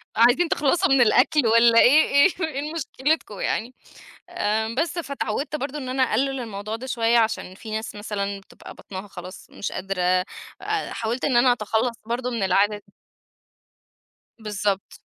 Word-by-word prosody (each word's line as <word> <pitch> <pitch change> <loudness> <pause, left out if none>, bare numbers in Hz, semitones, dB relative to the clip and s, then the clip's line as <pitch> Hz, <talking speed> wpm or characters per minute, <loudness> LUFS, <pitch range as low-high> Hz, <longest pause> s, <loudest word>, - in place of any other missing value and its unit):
عايزين 245 +10 +4
تخلصوا 345 +6 +2
من 270 -2 +4
الأكل 250 +3 +4
والّا 230 +1 +6
إيه 295 +5 +6
إيه 280 +7 +5 0.2
إيه 300 +1 -5
مشكلتكم 285 - -2
يعني. 240 +3 -2 0.6
آآ، 220 -9 -1
بس 335 +1 -1
فأتعودت 280 -1 -3
برضو 285 +1 -5
إن 260 -2 -6
أنا 260 +1 0
أقلل 265 +2 0
الموضوع 215 -1 -5
ده 255 - -8
شويّة، 235 -1 +2
عشان 220 -4 -1
في 220 +2 -10
ناس 220 +1 -4
مثلًا 200 -1 -4
بتبقى - - -14
بطنها 195 +1 -9
خلاص 185 0 -10
مش - - -5
قادرة، 185 -1 0 0.7
حاولت 230 +3 -3
إن 260 - +2
أنا 245 +1 +5
أتخلص 225 +1 -1
برضو 245 +2 -2
من 230 -4 -3
العادة 200 +2 +2
دي. 195 - -27 1.5
بالضبط. 205 -2 -3
230 Hz, 150 wpm, -23 LUFS, 210-270 Hz, 1.5 s, والّا